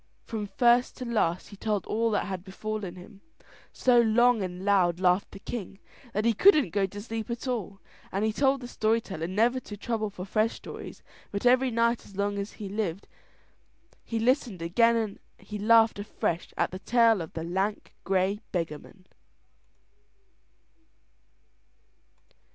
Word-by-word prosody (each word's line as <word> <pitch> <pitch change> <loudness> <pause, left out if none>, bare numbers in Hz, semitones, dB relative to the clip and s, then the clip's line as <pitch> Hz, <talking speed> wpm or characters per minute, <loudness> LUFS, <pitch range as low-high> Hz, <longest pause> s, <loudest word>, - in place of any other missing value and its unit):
From 215 -3 -4
first 240 +3 +3
to 255 - -5
last 200 -7 0
he 205 - -11
told 210 0 -2
all 230 +1 0
that 210 - 0
had 190 -3 -5
befallen 200 -1 -5
him; 195 +3 -13 0.5
so 245 -2 +4
long 235 0 +4
and 185 0 -5
loud 180 -4 +3
laughed 185 +1 +2
the - - -11
king 195 -1 -6 0.3
that 215 0 -1
he 235 - +4
couldn't 300 - +5
go 195 0 +1
to 205 +2 -9
sleep 225 +1 -5
at 235 +2 -4
all. 205 -6 -3 0.3
And 200 +3 0
he 220 - 0
told 270 +2 +2
the 245 - -6
story 225 -1 +1
teller 185 -7 -5
never 230 +7 +2
to 210 -4 -9
trouble 220 0 -2
for 190 -2 -8
fresh 215 +3 +1
stories, - - -9 0.3
but 200 +3 -4
every 255 +1 +5
night 235 0 +1
as 200 - -15
long 200 0 0
as 200 +1 -5
he 210 - -7
lived 195 -2 -3 1.0
he 230 - -3
listened 235 - +1
again 230 +8 +3
and 220 -3 -2 0.2
he 210 0 -8
laughed 225 0 +5
afresh 180 -4 -3
at - - +1
the 185 - -6
tale 230 -2 +3
of 160 - -7
the 160 - -4
lank 190 +5 -2
grey 195 +1 +1
beggarman. 170 +2 -5
210 Hz, 160 wpm, -28 LUFS, 190-230 Hz, 1.0 s, couldn't